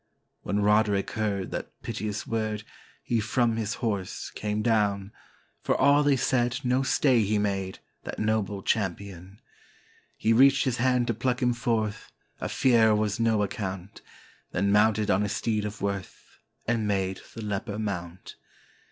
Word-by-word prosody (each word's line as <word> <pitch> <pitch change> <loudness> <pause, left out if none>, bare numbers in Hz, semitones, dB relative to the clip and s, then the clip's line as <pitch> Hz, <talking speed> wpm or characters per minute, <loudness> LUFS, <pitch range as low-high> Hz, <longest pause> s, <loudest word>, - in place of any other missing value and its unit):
When 105 +1 -1
Roderick 105 -1 +2
heard 105 -4 -2
that - - -6
piteous 105 0 -4
word, 110 -2 -2 0.4
he 120 - 0
from 115 +2 +1
his 110 +1 -2
horse 100 -6 -3
came 105 0 -2
down; 105 -3 +1 0.5
For - - +1
all 140 +2 +5
they 145 -1 +3
said 125 0 +1
no 125 +1 +2
stay 130 -2 +3
he 105 +1 +1
made, 95 -2 -1 0.3
that - - -6
noble 105 -2 -1
champion; 95 -1 -3 0.8
He 115 - +2
reached 135 +3 +5
his 130 -3 0
hand 125 0 +2
to 120 - 0
pluck 125 +3 -1
him 125 -2 +2
forth, 115 -3 -2 0.3
of - - -4
fear 115 -4 +4
was 105 +1 0
no 110 -2 +2
account, 95 -2 -5 0.5
Then 100 +2 +1
mounted 105 0 +3
on 95 - +3
his 105 0 -1
steed 110 -1 -1
of 105 0 -6
worth, 100 -1 -5 0.3
and 115 -2 0
made 95 -2 -1
the 115 - -6
leper 105 +1 -3
mount. 95 -4 -5
105 Hz, 150 wpm, -27 LUFS, 100-115 Hz, 0.8 s, all